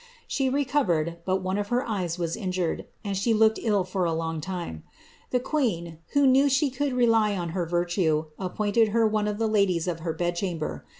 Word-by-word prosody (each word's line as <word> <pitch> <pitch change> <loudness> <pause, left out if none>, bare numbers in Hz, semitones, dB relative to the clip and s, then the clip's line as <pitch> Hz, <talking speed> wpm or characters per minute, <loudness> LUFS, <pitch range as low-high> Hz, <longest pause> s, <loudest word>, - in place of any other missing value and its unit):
She 270 -2 0
recovered, 245 - +1
)f 190 +2 0
her 245 +3 0
eyes 185 -6 -2
was 170 -2 -2
injured, 185 -4 -2 0.2
and 200 -2 -2
she 220 +4 +1
looked 220 0 +4
ill 205 -5 +2
for 185 +1 -2
a 165 -1 +1
long 165 -1 -2
time, 170 - -5 0.5
to, 235 - -1 0.2
who 285 -1 +4
knew 270 +2 +5
she 275 +1 +2
could 275 +1 -1
rely 225 -4 +3
on 175 -2 -3
her 175 0 -2
virtue, 175 -2 +1
appointed 205 +4 +1
her 225 - +4
one 215 -1 +1
dies 205 -5 +1
of 170 -2 -2
her 165 0 -3
bed 175 +1 -1
chamber. 170 -4 -3
195 Hz, 175 wpm, -26 LUFS, 170-230 Hz, 0.5 s, knew